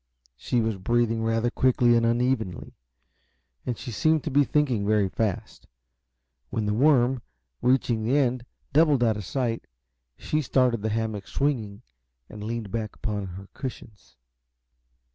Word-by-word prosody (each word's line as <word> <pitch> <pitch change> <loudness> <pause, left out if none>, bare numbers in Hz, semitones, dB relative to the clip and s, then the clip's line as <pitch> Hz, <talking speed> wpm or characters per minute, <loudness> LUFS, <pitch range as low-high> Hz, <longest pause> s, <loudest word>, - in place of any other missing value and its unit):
She 120 - 0
was 110 -2 -1
breathing 115 +3 +1
rather 115 +1 +1
quickly 125 -2 +3
and 115 0 +3
unevenly, 120 -5 -1 0.9
and 120 - -1
she 125 - -7
seemed 155 +5 +2
to 155 - -3
be 145 +2 +5
thinking 135 -7 +1
very 105 -1 +2
fast. 100 0 -3 0.8
When 110 - -2
the 105 - 0
worm, 130 0 +3 0.4
reaching 125 -3 +2
the 125 +6 +2
end, 130 -3 +1 0.3
doubled 150 -4 +4
out 110 -2 +3
of 105 - -6
sight, 120 +2 -2 0.5
she 155 - -1
started 125 -4 +2
the 110 - -1
hammock 110 -2 -2
swinging 120 -7 -2 0.5
and 105 -1 -8
leaned 110 -2 -4
back 110 -2 -3
upon 105 -3 -3
her 95 +2 -9
cushions. 105 - -9
115 Hz, 145 wpm, -26 LUFS, 105-130 Hz, 0.9 s, be